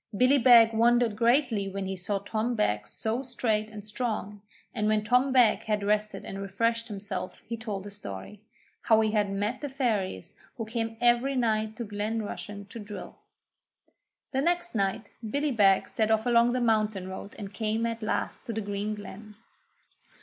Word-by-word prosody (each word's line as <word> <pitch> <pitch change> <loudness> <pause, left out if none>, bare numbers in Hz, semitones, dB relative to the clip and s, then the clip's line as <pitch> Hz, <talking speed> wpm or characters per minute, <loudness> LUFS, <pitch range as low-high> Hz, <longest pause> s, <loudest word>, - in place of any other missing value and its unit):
Billy 260 +4 +5
Beg 230 -2 +7
wondered 235 0 +3
greatly 235 -3 +2
when 195 0 -4
he 190 0 -3
saw 195 +2 -1
Tom 220 +4 -2
Beg 105 - 0
so 220 - -2
straight 225 -4 -1
and 210 -2 -9
strong, 210 -2 -3 0.3
and 210 -1 0
when 215 0 +2
Tom 250 +5 +3
Beg 250 -4 +5
had 210 -2 0
rested 210 +1 0
and 195 0 -6
refreshed 230 +4 0
himself 195 -3 -5
he 230 - -4
told 210 -4 -5
his 205 0 -9
story: 100 - -8 0.4
how 220 -1 +4
he 220 -1 +1
had 210 -2 +1
met 205 +6 -2
the 290 - -3
Fairies 215 - -2 0.2
who 225 - -3
came 225 0 -3
every 240 +3 +3
night 220 -3 0
to 235 - -4
Glen 215 +1 -2
Rushen 205 -1 -7
to 230 - -8
drill. 210 -1 -9 1.1
The 265 -1 0
next 350 +2 0
night 195 -1 -1 0.2
Billy 285 +5 0
Beg 200 -5 +4
set 220 -1 0
off 220 0 +2
along 240 0 +4
the 255 - 0
mountain 215 -4 +1
road 190 +2 -8
and 200 -2 -7
came 220 +2 -1
at 230 0 -3
last 215 - -2
to 230 - -3
the 220 - -2
green 205 +1 -3
glen. 210 +1 -10
215 Hz, 180 wpm, -28 LUFS, 205-235 Hz, 1.1 s, Beg